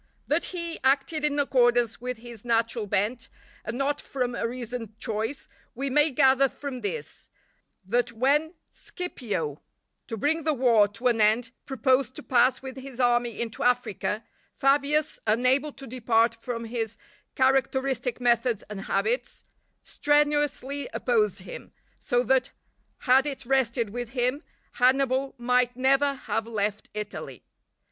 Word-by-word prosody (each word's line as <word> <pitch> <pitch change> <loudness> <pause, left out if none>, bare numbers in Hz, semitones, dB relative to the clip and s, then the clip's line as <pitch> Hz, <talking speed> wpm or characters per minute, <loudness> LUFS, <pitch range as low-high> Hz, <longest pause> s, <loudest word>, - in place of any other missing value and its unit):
That - - +1
he 340 -2 -5
acted 275 +3 +2
in 295 -1 +1
accordance 240 -5 +2
with 250 -1 -4
his 230 -2 -11
natural 230 -2 0
bent, 225 +5 -1 0.3
and 230 - -4
not 285 +2 0
from 250 -2 -3
a 235 - -1
reasoned 235 -2 -6
choice, 225 +3 -3 0.3
we 275 +2 -3
may 295 +3 +4
gather 265 0 +4
from 270 -3 -7
this, 465 +3 -6 0.6
that 240 +4 +1
when 290 +8 +1 0.2
Scipio, 205 - -5 0.5
to 225 - -5
bring 310 +8 +1
the 310 -1 +1
war 235 -5 +4
to 230 +5 -12
an 225 -2 +1
end, 225 +3 +3 0.2
proposed 260 0 +1
to 300 - -7
pass 255 0 +3
with 265 -1 -7
his 265 -1 -9
army 240 -2 +2
into 230 -2 -3
Africa, 235 -3 0 0.3
Fabius, 285 +2 +2
unable 255 +7 +3
to 275 - -11
depart 230 -2 +2
from 230 0 -5
his 225 -1 -4 0.4
characteristic 265 -2 +1
methods 235 -2 +2
and 195 -1 -6
habits, 485 +2 -1 0.4
strenuously 290 -1 0
opposed 450 -4 +1
him; - - -10 0.3
so 245 0 +1
that 260 +2 +2 0.5
had 265 +2 +4
it 270 -2 -5
rested 235 -4 +1
with 245 0 -5
him, 255 +3 0 0.3
Hannibal 265 +1 +2
might 250 0 +1
never 275 +2 +3
have 225 -3 -3
left 210 -2 -2
Italy. 210 0 -6
250 Hz, 140 wpm, -26 LUFS, 230-275 Hz, 0.6 s, may